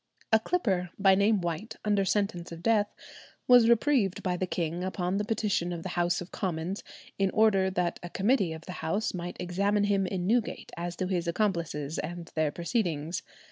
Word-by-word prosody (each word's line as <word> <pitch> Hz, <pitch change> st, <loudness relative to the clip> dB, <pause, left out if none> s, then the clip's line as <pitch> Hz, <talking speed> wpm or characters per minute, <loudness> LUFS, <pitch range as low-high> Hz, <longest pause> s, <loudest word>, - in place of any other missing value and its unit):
A 220 Hz, -, +7 dB
clipper, 200 Hz, -, 0 dB
by 195 Hz, -1 st, +5 dB
name 200 Hz, +1 st, +3 dB
White, 175 Hz, +7 st, -4 dB
under 205 Hz, -2 st, +2 dB
sentence 190 Hz, -4 st, -1 dB
of 170 Hz, 0 st, -9 dB
death, 215 Hz, -2 st, +3 dB, 0.6 s
was 245 Hz, -2 st, +7 dB
reprieved 235 Hz, -5 st, +2 dB
by 180 Hz, -2 st, 0 dB
the 185 Hz, +1 st, -2 dB
king 170 Hz, 0 st, -2 dB
upon 185 Hz, 0 st, -1 dB
the 205 Hz, -, 0 dB
petition 210 Hz, -5 st, 0 dB
of 170 Hz, -1 st, -5 dB
the 185 Hz, -, -4 dB
House 175 Hz, 0 st, 0 dB
of 180 Hz, -, -9 dB
Commons 180 Hz, 0 st, -3 dB, 0.4 s
in 195 Hz, -1 st, +3 dB
order 205 Hz, -4 st, +4 dB
that 180 Hz, -2 st, -1 dB
a 175 Hz, -, -7 dB
committee 200 Hz, -1 st, +2 dB
of 160 Hz, 0 st, -8 dB
the -, -, -6 dB
House 205 Hz, +7 st, -1 dB
might 175 Hz, -1 st, -5 dB
examine 200 Hz, +4 st, +1 dB
him 200 Hz, -2 st, +2 dB
in 180 Hz, -1 st, -2 dB
Newgate 225 Hz, +3 st, 0 dB
as 175 Hz, 0 st, -4 dB
to 185 Hz, -, -2 dB
his 180 Hz, -2 st, -1 dB
accomplices 170 Hz, -6 st, -1 dB
and 175 Hz, 0 st, -6 dB
their 155 Hz, -1 st, +1 dB
proceedings. 170 Hz, -, -1 dB
185 Hz, 185 wpm, -29 LUFS, 175-205 Hz, 0.6 s, A